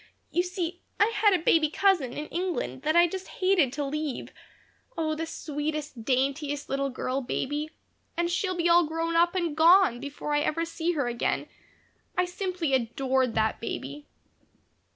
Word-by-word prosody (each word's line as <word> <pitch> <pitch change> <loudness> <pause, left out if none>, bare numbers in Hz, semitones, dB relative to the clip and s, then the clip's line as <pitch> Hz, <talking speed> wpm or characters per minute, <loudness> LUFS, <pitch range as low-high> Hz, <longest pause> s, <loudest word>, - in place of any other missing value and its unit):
"You 350 - +2
see, 360 -1 -4 0.2
I 440 +2 +4
had 420 -1 +4
a 340 - -2
baby 315 -2 +4
cousin 345 -7 +2
in 295 - -5
England 370 +7 -3
that 310 +1 0
I 345 0 +7
just 375 +2 -5
hated 370 -8 +2
to 290 0 -2
leave 295 -1 -4 0.6
Oh, 315 -1 0
the 325 +1 -3
sweetest, 295 -5 -4
daintiest 280 +4 0
little 275 0 0
girl 260 +1 -2
baby 290 +4 -2 0.5
and 345 0 +1
she'll 370 +1 0
be 340 0 +2
all 340 -1 +5
grown 330 +1 -2
up 345 +2 +3
and 340 -5 -1
gone 335 -5 +6
before 285 +2 -5
I 295 - +3
ever 330 +3 0
see 335 +1 -2
her 285 -5 0
again. 240 -1 -1 0.7
I 360 - +3
simply 360 -4 -2
adored 260 0 +1
that 220 0 +1
baby." 145 -9 -6
310 Hz, 165 wpm, -27 LUFS, 275-350 Hz, 0.7 s, I